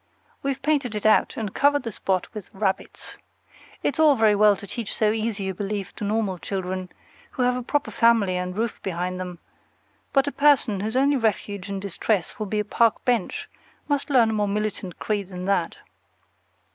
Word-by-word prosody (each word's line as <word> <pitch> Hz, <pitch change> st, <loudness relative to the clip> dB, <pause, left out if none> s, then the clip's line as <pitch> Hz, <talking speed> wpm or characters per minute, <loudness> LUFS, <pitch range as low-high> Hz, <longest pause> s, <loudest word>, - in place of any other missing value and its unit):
We've 275 Hz, -1 st, -2 dB
painted 275 Hz, -6 st, +1 dB
it 210 Hz, -, -4 dB
out, 215 Hz, -, +4 dB
and 210 Hz, -4 st, -3 dB
covered 290 Hz, 0 st, +3 dB
the 230 Hz, -, -4 dB
spot 190 Hz, -2 st, -2 dB
with 210 Hz, -4 st, -8 dB
rabbits. 190 Hz, -1 st, -3 dB, 0.7 s
It's 290 Hz, -, -1 dB
all 305 Hz, -3 st, +6 dB
very 220 Hz, -3 st, +4 dB
well 205 Hz, 0 st, +5 dB
to 200 Hz, -, -10 dB
teach 225 Hz, +1 st, -5 dB
so 215 Hz, -1 st, +2 dB
easy 215 Hz, -3 st, -2 dB
a -, -, -2 dB
belief 200 Hz, 0 st, -4 dB
to -, -, -5 dB
normal 205 Hz, -3 st, -1 dB
children, 185 Hz, -1 st, -4 dB, 0.4 s
who 255 Hz, -, 0 dB
have 250 Hz, 0 st, +2 dB
a 250 Hz, -, -2 dB
proper 290 Hz, +4 st, -1 dB
family 230 Hz, -6 st, +3 dB
and 180 Hz, +1 st, -3 dB
roof 230 Hz, +1 st, -2 dB
behind 180 Hz, 0 st, -3 dB
them; 180 Hz, -1 st, -5 dB, 0.7 s
but 275 Hz, 0 st, +3 dB
a -, -, 0 dB
person 280 Hz, -9 st, +3 dB
whose 215 Hz, +4 st, -3 dB
only 280 Hz, +1 st, +3 dB
refuge 205 Hz, -4 st, -1 dB
in 195 Hz, -1 st, -3 dB
distress 200 Hz, 0 st, -2 dB
will 215 Hz, -, -2 dB
be 210 Hz, +2 st, -1 dB
a 210 Hz, -, -1 dB
park 230 Hz, +2 st, +2 dB
bench 245 Hz, -2 st, 0 dB, 0.4 s
must 285 Hz, -1 st, -1 dB
learn 240 Hz, -5 st, +4 dB
a -, -, -2 dB
more 210 Hz, -1 st, +1 dB
militant 205 Hz, -3 st, -3 dB
creed 205 Hz, -3 st, -2 dB
than 180 Hz, -1 st, -6 dB
that. 195 Hz, -4 st, 0 dB
210 Hz, 190 wpm, -24 LUFS, 195-235 Hz, 0.7 s, all